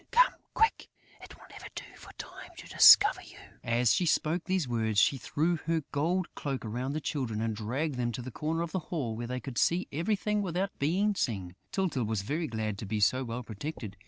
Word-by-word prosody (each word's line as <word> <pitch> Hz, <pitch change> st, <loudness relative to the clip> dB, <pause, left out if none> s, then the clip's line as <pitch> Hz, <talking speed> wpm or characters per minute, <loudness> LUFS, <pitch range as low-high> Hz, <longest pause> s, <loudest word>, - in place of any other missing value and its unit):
"Come -, -, +5 dB, 0.2 s
quick: 445 Hz, -, +2 dB, 0.3 s
it -, -, -12 dB
will -, -, -16 dB
never -, -, -10 dB
do -, -, -5 dB
for -, -, -13 dB
Time -, -, -9 dB
to -, -, -10 dB
discover 415 Hz, -, +7 dB
you." -, -, -14 dB, 0.3 s
As 120 Hz, -1 st, +3 dB
she 180 Hz, -, +1 dB
spoke 160 Hz, +2 st, +1 dB
these 185 Hz, -5 st, 0 dB
words, 110 Hz, -3 st, +1 dB
she 135 Hz, +6 st, +3 dB
threw 165 Hz, +7 st, 0 dB
her 165 Hz, 0 st, -1 dB
gold 170 Hz, +5 st, 0 dB
cloak 135 Hz, -5 st, -4 dB
around 125 Hz, +5 st, -3 dB
the 155 Hz, -, -1 dB
Children 125 Hz, -8 st, -2 dB
and 110 Hz, -1 st, -1 dB
dragged 125 Hz, +7 st, -2 dB
them 120 Hz, -1 st, 0 dB
to 120 Hz, -, -5 dB
a 130 Hz, -, -6 dB
corner 160 Hz, +6 st, -2 dB
of 170 Hz, -, -5 dB
the 190 Hz, -, -1 dB
hall, 130 Hz, -10 st, -2 dB
where 120 Hz, +1 st, -5 dB
they 125 Hz, +1 st, -3 dB
could 130 Hz, -2 st, -4 dB
see 175 Hz, +2 st, +2 dB
everything, 210 Hz, +6 st, 0 dB
without 190 Hz, +1 st, -2 dB
being 190 Hz, +9 st, +2 dB
seen. 95 Hz, -, -2 dB, 0.2 s
Tyltyl 175 Hz, -, 0 dB
was 105 Hz, -2 st, -2 dB
very 155 Hz, +9 st, -2 dB
glad 110 Hz, -3 st, -3 dB
to 105 Hz, -, -6 dB
be 105 Hz, +1 st, -1 dB
so 115 Hz, +6 st, +3 dB
well 120 Hz, 0 st, -5 dB
protected. 110 Hz, -1 st, -6 dB
135 Hz, 215 wpm, -30 LUFS, 115-170 Hz, 0.3 s, discover